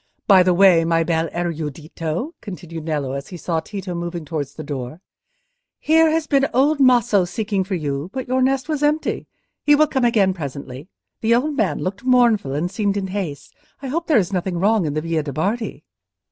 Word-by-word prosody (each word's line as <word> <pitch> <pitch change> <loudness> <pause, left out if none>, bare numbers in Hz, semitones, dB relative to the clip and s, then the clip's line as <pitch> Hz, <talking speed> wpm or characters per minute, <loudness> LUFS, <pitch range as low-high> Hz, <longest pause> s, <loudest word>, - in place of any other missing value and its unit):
By 195 -3 +7
the 180 -1 +3
way, 180 -3 +6
my 165 0 +2
bel 165 -1 0
erudito," 165 - -4
continued 170 -5 -8
Nello, 145 -5 -2
as 140 +1 -5
he 180 - -8
saw 165 0 -1
Tito 190 +2 -6
moving 170 -1 -5
towards 145 -2 -4
the 155 - -7
door, 140 0 -6 0.8
"here 320 +1 +4
has 320 0 0
been 275 -2 +2
old 285 +3 +3
Maso 240 -7 +4
seeking 200 +2 -2
for 190 +1 -3
you, 145 -1 -3
but 260 +1 -5
your 260 +1 +1
nest 265 +1 +1
was 305 -3 -2
empty. 300 +1 0 0.4
He 295 - +5
will 305 +1 +5
come 270 -4 -1
again 210 -6 +3
presently. 140 -3 -7 0.3
The 230 +1 +3
old 290 +5 0
man 185 - 0
looked 190 +4 -4
mournful, 235 - +3
and 170 +5 -2
seemed 200 0 -1
in 190 -1 -3
haste. 175 -8 -5 0.3
I 270 - -4
hope 335 +5 -2
there 310 - +4
is 195 -2 0
nothing 180 -1 -1
wrong 200 -1 +2
in 145 - -3
the 155 - 0
Via 165 0 -1
de' 145 -2 -6
Bardi." 200 - -2
185 Hz, 200 wpm, -21 LUFS, 160-245 Hz, 0.8 s, By